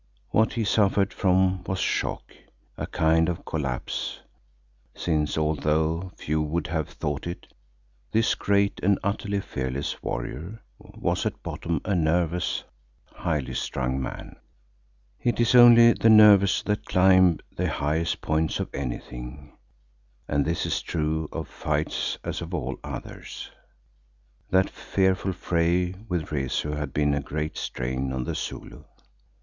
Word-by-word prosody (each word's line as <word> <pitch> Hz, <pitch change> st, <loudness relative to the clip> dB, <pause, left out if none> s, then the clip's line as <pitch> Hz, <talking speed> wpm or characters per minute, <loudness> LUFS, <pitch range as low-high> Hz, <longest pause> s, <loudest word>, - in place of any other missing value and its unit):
What 110 Hz, +1 st, +3 dB
he 115 Hz, -, -1 dB
suffered 100 Hz, -2 st, +2 dB
from 95 Hz, -1 st, +2 dB
was 95 Hz, -, -2 dB
shock, -, -, -2 dB, 0.4 s
a -, -, -4 dB
kind 80 Hz, +1 st, +2 dB
of 85 Hz, -, -4 dB
collapse, 70 Hz, -6 st, -3 dB, 0.7 s
since, 75 Hz, -3 st, 0 dB
although 80 Hz, +3 st, 0 dB
few 75 Hz, +1 st, -1 dB
would 80 Hz, +3 st, -1 dB
have 80 Hz, -2 st, -2 dB
thought 75 Hz, +2 st, -4 dB
it, 85 Hz, -, -6 dB, 0.7 s
this 115 Hz, +1 st, +3 dB
great 100 Hz, 0 st, +1 dB
and 100 Hz, +1 st, +3 dB
utterly 100 Hz, 0 st, -1 dB
fearless 65 Hz, -5 st, -4 dB
warrior 80 Hz, -, -5 dB, 0.2 s
was -, -, -2 dB
at -, -, -6 dB
bottom 85 Hz, -1 st, -3 dB
a 100 Hz, -, 0 dB
nervous, 85 Hz, 0 st, +1 dB, 0.5 s
highly 75 Hz, -6 st, -2 dB
strung 65 Hz, 0 st, -2 dB
man. -, -, -7 dB, 0.8 s
It 120 Hz, -3 st, 0 dB
is 120 Hz, 0 st, +3 dB
only 120 Hz, -1 st, +9 dB
the 115 Hz, -, +3 dB
nervous 105 Hz, -3 st, +7 dB
that 105 Hz, 0 st, -1 dB
climb 95 Hz, -2 st, +5 dB, 0.2 s
the -, -, 0 dB
highest 80 Hz, +3 st, -1 dB
points 80 Hz, +1 st, 0 dB
of -, -, -4 dB
anything, 65 Hz, +1 st, -6 dB, 0.7 s
and 70 Hz, 0 st, +1 dB
this 85 Hz, +2 st, -1 dB
is -, -, -1 dB
true 80 Hz, -1 st, -2 dB
of -, -, -5 dB
fights -, -, -2 dB
as -, -, -4 dB
of -, -, -4 dB
all -, -, -3 dB
others. -, -, -8 dB, 1.0 s
That 95 Hz, 0 st, +3 dB
fearful 95 Hz, 0 st, 0 dB
fray 90 Hz, 0 st, +1 dB, 0.2 s
with 85 Hz, -4 st, -2 dB
Rezu 75 Hz, +1 st, -1 dB
had 75 Hz, 0 st, -3 dB
been 75 Hz, -1 st, +1 dB
a 70 Hz, -, 0 dB
great 75 Hz, +2 st, -4 dB
strain 65 Hz, +2 st, -3 dB
on 65 Hz, -1 st, -2 dB
the -, -, -3 dB
Zulu. -, -, -6 dB
85 Hz, 135 wpm, -26 LUFS, 75-95 Hz, 1.0 s, only